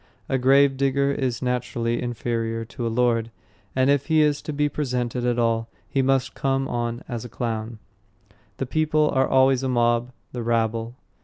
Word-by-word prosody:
A 135 - 0
gravedigger 140 +1 +3
is 130 -3 -2
naturally 120 -1 -1
inferior 115 -1 -2
to 115 +1 -5
a - - 0
lord, 115 -1 +1 0.5
and 130 0 +3
if 140 -1 +2
he 160 -1 +4
is 150 -1 +2
to - - -5
be 150 0 +1
presented 125 -4 -2
at 120 -1 +1
all, 115 -1 +1 0.2
he 135 - 0
must 135 -2 +1
come 135 0 0
on 120 -1 -3
as 120 -2 -4
a 120 - -8
clown. 115 -1 -4 0.8
The 135 - -2
people 155 +2 +1
are 130 0 +2
always 130 -1 +4
a 135 - -1
mob, 120 0 +1 0.2
the 125 - -4
rabble. 115 0 -1
125 Hz, 170 wpm, -24 LUFS, 115-135 Hz, 0.8 s, he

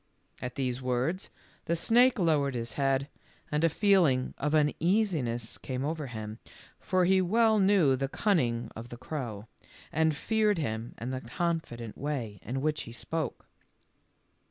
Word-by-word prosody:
At 125 0 -5
these 130 -1 -2
words 130 +9 -1 0.4
the 170 - +1
snake 240 +9 +4
lowered 150 -7 +2
his 115 0 -3
head, 135 0 +1 0.4
and 150 +1 +1
a 165 - +5
feeling 165 -8 +3
of 150 +2 +1
uneasiness 150 - +1
came 130 +1 -3
over 155 -1 -3
him, 110 -1 -6 0.4
for 185 -1 +2
he 190 +1 +4
well 220 +4 +3
knew 190 -9 +4
the 135 +1 -1
cunning 130 - 0
of 115 +2 -8
the 120 - -8
crow, 120 -6 -5 0.5
and 160 -1 +2
feared 215 +4 +1
him 115 -6 -3
and 125 +3 -4
the 130 - -3
confident 120 -4 -3
way 125 -8 -3
in 130 +4 -3
which 150 0 0
he - - -9
spoke. 155 +6 -3
145 Hz, 150 wpm, -29 LUFS, 125-175 Hz, 0.5 s, a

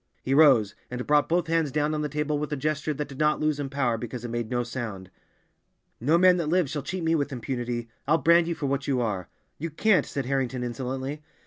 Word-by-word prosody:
He 130 - 0
rose, 130 -9 +5 0.2
and 125 0 -4
brought 150 0 +3
both 175 +1 +2
hands 165 -3 +1
down 150 +2 0
on 150 - -1
the 150 - -2
table 150 0 -1
with 150 0 -4
a - - 0
gesture 155 +2 -1
that 150 0 -3
did 140 -2 -11
not 150 0 +2
lose 155 -1 0
in 140 -1 -3
power 130 -5 0
because 120 +1 -6
it - - -4
made 120 -1 -3
no 120 -1 0
sound. 110 -7 -6 0.9
"No 150 +8 +3
man 180 0 +6
that 165 -4 -1
lives 175 -4 +2
shall 150 - -2
cheat 175 +6 -4
me 165 0 +2
with 145 -2 0
impunity. 120 -2 -3 0.2
I'll 155 +3 +4
brand 170 +1 +4
you 170 - -1
for 145 - -4
what 140 0 -1
you 135 -3 +1
are!" 100 -7 -2 0.3
"You 165 +3 -3
can't," 195 +5 +2
said 140 -3 -3
Harrington 130 -2 -1
insolently. 130 +4 -4
140 Hz, 235 wpm, -26 LUFS, 125-155 Hz, 0.9 s, man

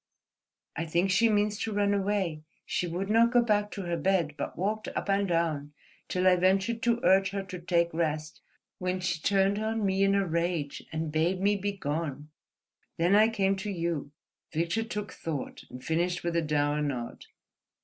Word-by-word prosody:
"I 165 +1 -3
think 175 +4 +1
she 230 +5 +4
means 210 0 +1
to 225 - -2
run 205 -1 +2
away. 195 -5 0 0.2
She 180 - -1
would 180 +3 -3
not 230 +3 +4
go 245 -1 +5
back 210 -2 +1
to 200 - -5
her 175 -1 -2
bed, 170 -2 +1
but - - -5
walked 210 +5 -1
up - - -4
and 200 0 +2
down, 160 -4 -1 0.3
till 185 0 -1
I 185 -1 +6
ventured 190 +5 +2
to 235 0 +2
urge 190 -2 +4
her 195 0 -3
to 185 -2 -7
take 170 -1 +1
rest, 155 -1 -2 0.4
when 185 0 -1
she 175 -3 -2
turned 200 +2 +2
on 220 0 -1
me 190 0 +1
in 195 0 +3
a 200 -1 +2
rage 170 -3 -1
and 160 -1 -3
bade 165 +4 +1
me 200 +2 +3
be 200 +1 -2
gone. 150 -4 -4 0.7
Then 175 +3 +3
I 215 +2 +6
came 195 -3 +1
to 200 +2 -4
you." 170 -6 -2 0.4
Victor 170 +7 0
took 210 -2 -4
thought 155 -5 -5
and 125 0 -10
finished 175 +2 0
with 170 -1 -1
a 170 - +3
dour 150 -1 +1
nod. 130 -5 -4
185 Hz, 190 wpm, -29 LUFS, 165-200 Hz, 0.7 s, I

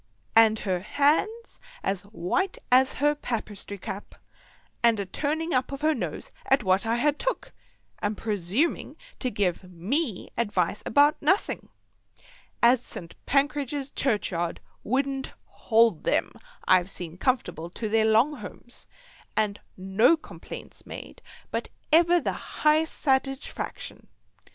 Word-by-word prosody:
And 220 -1 +7
her 185 -4 -1
hands 305 - +1 0.2
as 195 -2 -1
white 215 - -1
as 260 +1 +5
her 295 +2 +2
papistry 215 -7 -5
cap, 195 +1 -7 0.7
and 235 -2 +4
she 200 - -1
a - - -9
turning 310 - -2
up 255 +1 +1
of 275 +1 -5
her 310 +1 +3
nose - - -5 0.2
at 270 -3 +4
what 190 +3 +2
I 230 - +2
had 295 +4 +1
took, - - -2 0.5
and 205 0 -1
a - - -12
presuming 210 - 0 0.2
to 255 - +1
give 190 -4 -1
me 215 - -2
advice 205 -4 0
about 290 +5 +4
nussing, 375 +7 +1 0.9
as 245 +1 +6
St. 170 -2 -9
Pancradge's 280 0 0
Churchyard 185 -9 0 0.2
wouldn't 270 +3 -1
hold 225 -6 +2
them - - +1 0.4
I've 185 0 +5
seen 175 -2 -5
comfortable 180 - 0
to 220 +5 -4
their 220 +1 +3
long 230 +7 +4
homes, - - -9 0.5
and 210 -1 +1 0.2
no 195 - +4
complaints 315 - -10
made - - -9 0.3
but - - -2 0.2
ever 345 +2 +6
the - - -1
highest 310 +1 +1
satigefaction. 270 0 -1
235 Hz, 130 wpm, -27 LUFS, 200-290 Hz, 0.9 s, And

